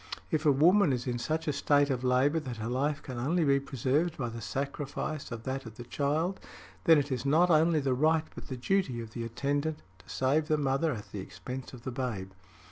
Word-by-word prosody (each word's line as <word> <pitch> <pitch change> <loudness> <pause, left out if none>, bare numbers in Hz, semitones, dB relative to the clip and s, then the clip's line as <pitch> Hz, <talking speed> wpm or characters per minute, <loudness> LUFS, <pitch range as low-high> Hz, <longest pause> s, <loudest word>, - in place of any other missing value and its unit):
If 155 0 +1
a - - +7
woman 170 +5 +5
is 125 -2 -1
in 120 -2 -2
such 160 +6 -2
a 150 - +1
state 145 0 +3
of 130 -1 -2
labor 130 +5 +3
that 130 -6 -6
her 110 +1 -4
life 145 +5 -1
can 125 -3 -6
only 165 +8 +1
be 140 -1 +4
preserved 140 +5 0
by 120 -3 -2
the 115 0 -7
sacrifice 140 +4 -4
of 115 -1 -6
that 130 -1 -4
of 110 - -10
the 120 - -8
child, 150 +9 -1 0.5
then 165 -1 +7
it 145 -1 0
is 125 -2 -1
not 160 +6 +4
only 160 0 +4
the 135 -2 +1
right 155 +4 +2
but - - -9
the 130 - -5
duty 135 -2 0
of 115 -1 -7
the 115 - -5
attendant 145 +6 -1 0.2
to - - -20
save 145 +4 +1
the 155 - +2
mother 140 +2 +1
at 105 -6 -7
the 105 - -5
expense 125 +7 -7
of 125 -2 -11
the 130 - -4
babe. 120 -7 -3
140 Hz, 225 wpm, -30 LUFS, 125-155 Hz, 0.5 s, a